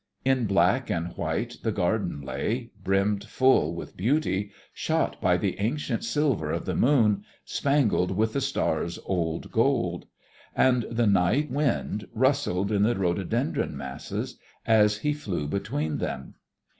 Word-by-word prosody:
In 130 -3 +2
black 100 +6 +2
and 85 0 -2
white - - -2
the - - 0
garden 70 - -1
lay, 115 - -3
brimmed 100 +2 +1
full 130 - +3
with - - -8
beauty, 105 - 0 0.2
shot - - -1
by - - +3
the - - -2
ancient 120 +2 -1
silver 120 - 0
of - - -2
the - - -1
moon, 115 -7 +3 0.2
spangled 140 -10 +1
with 110 +3 0
the 140 - 0
stars' 85 -8 -1
old 85 -3 -2
gold. 115 -8 +1 0.5
And 125 -3 +3
the 115 0 +1
night 105 +9 +2
wind 130 -7 -1
rustled 115 -7 +1
in 100 -2 +2
the 115 +3 +3
rhododendron 90 0 -1
masses 65 -1 -5 0.3
as 105 -2 +4
he 150 +7 0
flew 100 - -3
between 80 -3 -2
them. 65 - -4
105 Hz, 140 wpm, -26 LUFS, 90-130 Hz, 0.5 s, as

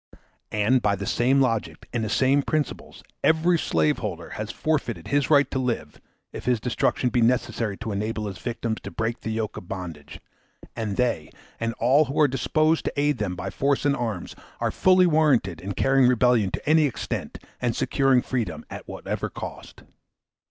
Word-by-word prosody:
And 110 +5 +2
by 100 -1 +2
the 100 +1 -5
same 130 +6 +2
logic 115 -5 -1
and 120 -2 -1
the 110 - -2
same 135 +6 +3
principles, 150 +1 -3 0.2
every 160 +2 +3
slave 80 - +1
holder - - -5
has 105 0 -5
forfeited 155 +5 -2
his 145 -1 +1
right 145 -2 +6
to 130 - -1
live, 120 - -3 0.3
if - - -7
his 125 -2 +2
destruction 125 +1 0
be 120 - +2
necessary 115 -3 +1
to 110 -1 -5
enable 105 +2 -2
his 100 -3 -6
victims 115 -2 -3
to - - -7
break 115 +1 -2
the - - -4
yoke 110 -1 -3
of 90 - -9
bondage; 85 -7 -7 0.6
and 110 -3 -3
they, 120 -11 0 0.3
and 115 0 -1
all 135 +6 +4
who 140 +2 -3
are 150 - +6
disposed 155 +4 +1
to - - -2
aid 145 0 +1
them 95 -4 -2
by - - -5
force 140 +1 0
and 140 -1 +3
arms, 115 -8 -4 0.2
are - - 0
fully 185 0 +4
warranted 140 - +2
in 100 +2 -4
carrying 135 +6 +4
rebellion 125 -4 +3
to - - -6
any 155 0 +5
extent, 130 - -4 0.2
and 120 -2 0
securing 135 -3 +2
freedom 125 -4 -3
at - - -8
whatever - - -4
cost. - - -9
120 Hz, 180 wpm, -25 LUFS, 105-140 Hz, 0.6 s, right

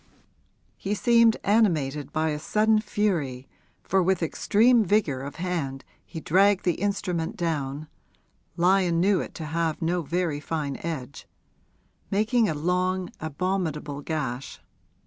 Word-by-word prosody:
He 200 +2 -2
seemed 230 0 +4
animated 150 - +1
by 160 +1 0
a 150 -1 -2
sudden 215 +6 +2
fury, 165 - -1 0.4
for 190 0 +2
with 185 -1 +1
extreme 225 +8 +3
vigour 175 -10 +1
of 140 +1 -7
hand 160 -7 -3 0.2
he 165 - -8
dragged 195 +5 +3
the 175 - +3
instrument 180 -5 -2
down 150 -3 -2 0.7
(Lyon 175 -1 +3
knew 195 +2 +3
it - - -8
to 160 - -6
have 160 0 -1
no 170 +2 0
very 165 -1 -1
fine 150 -2 -3
edge) 140 -5 -6 0.8
making 220 +2 +2
a 155 - -1
long, 180 +3 -1
abominable 155 -3 -3
gash. 140 -4 -4
170 Hz, 125 wpm, -26 LUFS, 150-195 Hz, 0.8 s, seemed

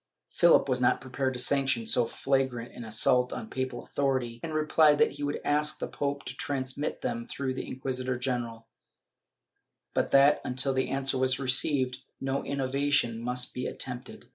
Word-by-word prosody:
Philip 170 -4 +5
was 130 -1 0
not 125 - +3
prepared 130 +1 -3
to - - -4
sanction 135 -2 +1
so 115 +1 +2
flagrant 130 -2 -1
an 120 - -8
assault 125 +3 +2
on 220 - -6
papal 130 -2 -3
authority, 130 -4 -1
and 160 - -5
replied 155 -1 +4
that - - +3
he - - -7
would 145 0 -2
ask 150 +1 +1
the - - -4
pope 140 0 -3
to - - -5
transmit 135 +1 -3
them 115 0 -3
through 130 -1 -3
the 130 - -6
inqui 130 0 -4
sitor 130 0 -2
general, 120 -3 -3 1.3
but - - 0
that, 140 +1 +5
until 130 +2 +1
the 130 0 0
answer 135 -1 0
was 130 0 +3
received, 130 -1 +2 0.2
no 135 +1 -1
inno 140 -1 -2
vation 140 -5 +1
must 125 +1 -2
be 125 - -3
attempted. 125 0 -6
130 Hz, 175 wpm, -28 LUFS, 125-140 Hz, 1.3 s, Philip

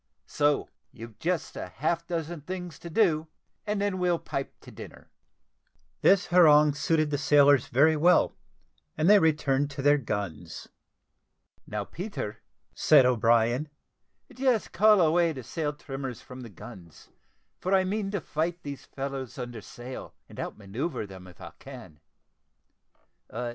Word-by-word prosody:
So 145 - +1 0.2
you've 115 -2 -12
just 175 0 -2
half 155 - -3
a - - -47
dozen 165 -1 -4
things 180 0 -7
to 170 - -9
do, 160 -4 +2 0.4
and 210 0 -1
then 200 -2 -1
we'll 180 -1 +2
pipe 135 -4 -6
to - - -13
dinner." - - -12 0.9
This 195 -1 +4
harangue 150 -4 +6
suited 155 +1 0
the 145 - -1
sailors 145 -3 +4
very 155 +6 +4
well, 175 +4 +3 0.6
and 155 +2 +1
they 205 +1 +7
returned 145 -4 +1
to 140 -1 -6
their 145 +1 +4
guns. 95 - -5 1.0
"Now, 105 0 -3
Peter," 150 - -6 0.3
said 145 -4 +5
O'Brien, 120 +3 +2 0.6
"just 255 -4 0
call 210 -2 +5
away 165 0 +3
the 130 -3 -8
sail 150 +5 -3
trimmers 135 -4 -7
from 130 0 -11
the 120 - -9
guns, 95 -5 -13 0.5
for 185 - -3
I 190 - +3
mean 200 +1 -2
to 200 -3 -3
fight 165 +4 -3
these 140 -2 -7
fellows 135 -2 -6
under 120 -3 -6
sail, 120 +6 -9
and - - -13
out - - -5
manoeuvre 110 - -4
them, 95 -2 -12
if 90 - -16
I - - -9
can. 120 - -12
145 Hz, 145 wpm, -27 LUFS, 120-170 Hz, 1.0 s, they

